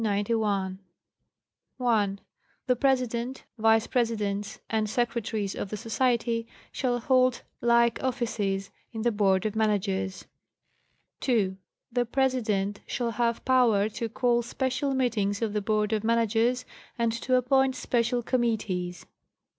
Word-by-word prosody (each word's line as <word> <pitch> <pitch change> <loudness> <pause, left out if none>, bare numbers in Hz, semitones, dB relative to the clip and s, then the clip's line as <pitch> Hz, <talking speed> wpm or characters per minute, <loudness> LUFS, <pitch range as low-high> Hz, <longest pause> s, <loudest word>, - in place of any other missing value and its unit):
1.—The 225 +1 -1
President, 250 -1 0 0.2
Vice 225 0 +4
Presidents 210 -4 -1
and 215 -1 0
Secretaries 225 -3 -1
of 200 - -5
the 210 - -4
Society 230 0 0 0.2
shall 245 -2 0
hold 255 0 +2 0.2
like 235 -1 +3
offices 205 -6 -1 0.2
in 220 -2 -4
the 240 - +3
Board 195 -3 +2
of 215 0 -1
Managers. 195 -3 0 1.0
2.—The 230 +2 -1
President 225 -6 0
'shall 235 -2 -1
have 235 +1 -1
power 240 -6 +4
to 225 +1 -4
call 240 +1 +2
special 260 +3 -1
meetings 210 -6 0
of 215 -2 -1
the 210 - 0
Board 210 +1 0
of 215 -1 0
Managers 230 +2 +2 0.3
and 230 -1 +1
to 250 +2 0
appoint 260 +1 +3
special 240 0 0
committees. 215 -8 -1
230 Hz, 115 wpm, -27 LUFS, 210-245 Hz, 1.0 s, Vice